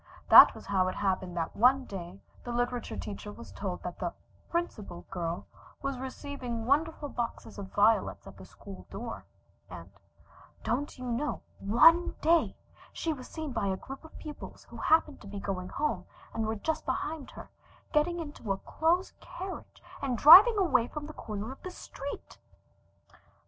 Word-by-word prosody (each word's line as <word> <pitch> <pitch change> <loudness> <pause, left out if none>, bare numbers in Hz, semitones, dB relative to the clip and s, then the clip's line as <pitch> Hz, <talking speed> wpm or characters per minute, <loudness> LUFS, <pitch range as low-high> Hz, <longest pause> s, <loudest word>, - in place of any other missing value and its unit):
That - - +10
was - - -11
how 190 -2 +2
it 185 - -2
happened 185 -2 -1
that 165 -1 -2
one 255 +4 +4
day 185 -2 -8 0.2
the 245 - -5
literature 245 0 -2
teacher 205 0 -6
was - - -11
told - - -5
that - - -6
the - - -2 0.4
"Principal 215 - -3
Girl" 170 -2 -3 0.4
was 275 -2 -2
receiving 255 -3 -5
wonderful 300 +3 +1
boxes 240 -5 -5
of 195 -1 -7
violets 215 +2 +2
at - - -11
the - - -11
school - - -12
door, - - -7 0.4
and - - -10 0.7
"Don't 280 +5 -2
you 255 - -7
know 250 +5 -2 0.2
ONE 325 - +5
DAY 330 +2 +3 0.3
she 325 - -2
was 255 -4 -9
seen 315 -3 -5
by 225 -5 -1
a 190 -1 0
group 270 +8 -9
of 320 - -13
pupils 300 -1 -9
who - - -9
happened 315 -2 +2
to 205 - -11
be 200 0 -6
going 185 -2 -4
home, 300 +1 -2 0.3
and 225 -1 -1
were 220 - -1
just 315 +9 -2
behind 305 -2 -3
her, - - -10 0.4
getting 340 +3 +2
into 290 -10 -5
a 195 - 0
closed 340 - 0
carriage 375 0 -8 0.2
and 255 -3 -1
driving 385 - +10
away 335 - +3
from 300 +2 -6
the 310 - -8
corner 215 -1 -5
of 270 - -11
the 370 - -6
street!" 285 -5 -8
255 Hz, 170 wpm, -30 LUFS, 205-310 Hz, 0.7 s, That